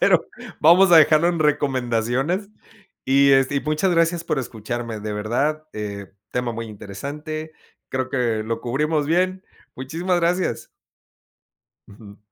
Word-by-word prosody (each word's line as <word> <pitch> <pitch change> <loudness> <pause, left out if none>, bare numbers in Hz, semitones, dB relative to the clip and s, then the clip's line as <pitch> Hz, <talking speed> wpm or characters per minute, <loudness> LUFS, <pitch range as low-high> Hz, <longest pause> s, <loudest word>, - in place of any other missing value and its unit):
pero - - +3 0.3
vamos 175 +4 +6
a 170 - +8
dejarlo 155 +2 +5
en 175 -1 -1
recomendaciones 135 - 0 0.6
y, 140 +1 +4
este, 135 +1 +3
y - - +1
muchas 155 +5 0
gracias 165 0 +1
por 135 - -1
escucharme, 115 -1 -5
de 105 0 -5
verdad, 135 +9 -1
eh, 100 -2 -6 0.2
tema 125 -1 -1
muy 115 0 -5
interesante, 145 +10 -7 0.4
creo 130 0 -2
que 115 -4 0
lo 115 +1 -3
cubrimos 150 +4 -1
bien. 185 +3 0 0.3
Muchísimas 170 +7 -1
gracias. 175 +2 -1 1.2
Ujú. 100 0 -14
140 Hz, 130 wpm, -22 LUFS, 115-165 Hz, 1.2 s, a